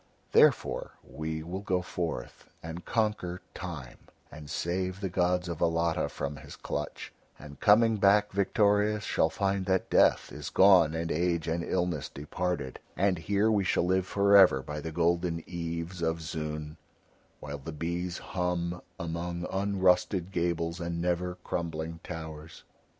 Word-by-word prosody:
Therefore -, -, +3 dB
we 80 Hz, 0 st, -4 dB
will 90 Hz, +4 st, -5 dB
go 90 Hz, -3 st, 0 dB
forth 80 Hz, -6 st, -5 dB
and 80 Hz, +1 st, -7 dB
conquer 105 Hz, -6 st, -1 dB
Time 75 Hz, -9 st, -7 dB, 0.3 s
and 75 Hz, -1 st, -10 dB
save 90 Hz, +3 st, -2 dB
the 95 Hz, -1 st, -2 dB
gods 90 Hz, 0 st, +1 dB
of 85 Hz, -2 st, -5 dB
Alatta 85 Hz, -1 st, +1 dB
from 70 Hz, +1 st, -4 dB
his 70 Hz, -, -11 dB
clutch, 75 Hz, -, -5 dB, 0.2 s
and 75 Hz, -2 st, -12 dB
coming 110 Hz, +1 st, +5 dB
back 105 Hz, +1 st, +4 dB
victorious 105 Hz, +1 st, +2 dB
shall 80 Hz, -, +2 dB
find 100 Hz, 0 st, -1 dB
that 95 Hz, -1 st, 0 dB
Death -, -, +4 dB
is 75 Hz, +2 st, -6 dB
gone 90 Hz, -5 st, +6 dB
and 80 Hz, 0 st, -2 dB
age 85 Hz, 0 st, 0 dB
and 85 Hz, +1 st, -1 dB
illness 85 Hz, -6 st, -1 dB
departed, 75 Hz, -1 st, -3 dB, 0.2 s
and 95 Hz, -2 st, +2 dB
here 100 Hz, +5 st, +2 dB
we 105 Hz, -2 st, +2 dB
shall 90 Hz, -, +1 dB
live 95 Hz, +1 st, +1 dB
for 100 Hz, 0 st, +3 dB
ever 90 Hz, -9 st, +7 dB
by 75 Hz, +2 st, -5 dB
the 80 Hz, -, -5 dB
golden 85 Hz, 0 st, 0 dB
eaves 85 Hz, 0 st, -5 dB
of 80 Hz, 0 st, 0 dB
Zoon, 75 Hz, -1 st, -5 dB, 0.6 s
while 70 Hz, 0 st, -6 dB
the 75 Hz, +4 st, -7 dB
bees 85 Hz, +3 st, -3 dB
hum 90 Hz, -1 st, -2 dB, 0.2 s
among 85 Hz, +1 st, -3 dB
unrusted 95 Hz, -1 st, +2 dB
gables 85 Hz, -1 st, -1 dB
and 85 Hz, -1 st, -3 dB
never 90 Hz, +1 st, -1 dB
crumbling 80 Hz, -1 st, -3 dB
towers. 80 Hz, -1 st, -8 dB
85 Hz, 145 wpm, -29 LUFS, 80-95 Hz, 0.6 s, ever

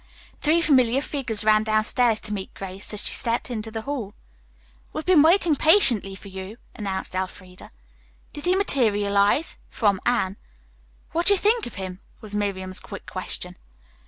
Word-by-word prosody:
Three 320 Hz, +3 st, +3 dB
familiar 260 Hz, -5 st, +3 dB
figures 260 Hz, -7 st, 0 dB
ran 215 Hz, 0 st, +4 dB
downstairs 220 Hz, +1 st, +1 dB
to 210 Hz, -, -4 dB
meet 195 Hz, -2 st, -6 dB
Grace 195 Hz, +1 st, -4 dB
as 210 Hz, -1 st, 0 dB
she -, -, +5 dB
stepped 235 Hz, +2 st, 0 dB
into 220 Hz, -2 st, -4 dB
the 220 Hz, 0 st, -6 dB
hall. 240 Hz, -8 st, -5 dB, 0.8 s
"We've 310 Hz, -, -5 dB
been 360 Hz, -5 st, +5 dB
waiting 330 Hz, 0 st, +4 dB
patiently 260 Hz, -, +4 dB
for 200 Hz, -, -12 dB
you," 190 Hz, +3 st, -8 dB, 0.2 s
announced 195 Hz, -3 st, -4 dB
Elfreda. 185 Hz, 0 st, -6 dB, 0.6 s
"Did 290 Hz, -, -7 dB
he 360 Hz, +1 st, +3 dB
materialize?" 210 Hz, -, +1 dB
from 200 Hz, -4 st, +1 dB
Anne. 210 Hz, -5 st, 0 dB, 0.7 s
"What 340 Hz, +2 st, 0 dB
do 405 Hz, -, +9 dB
you -, -, +2 dB
think 435 Hz, +4 st, +1 dB
of 240 Hz, -, -10 dB
him?" 185 Hz, -1 st, -6 dB, 0.2 s
was 215 Hz, -3 st, -7 dB
Miriam's 190 Hz, -2 st, -2 dB
quick -, -, -10 dB
question. -, -, -5 dB
220 Hz, 160 wpm, -24 LUFS, 200-285 Hz, 0.8 s, do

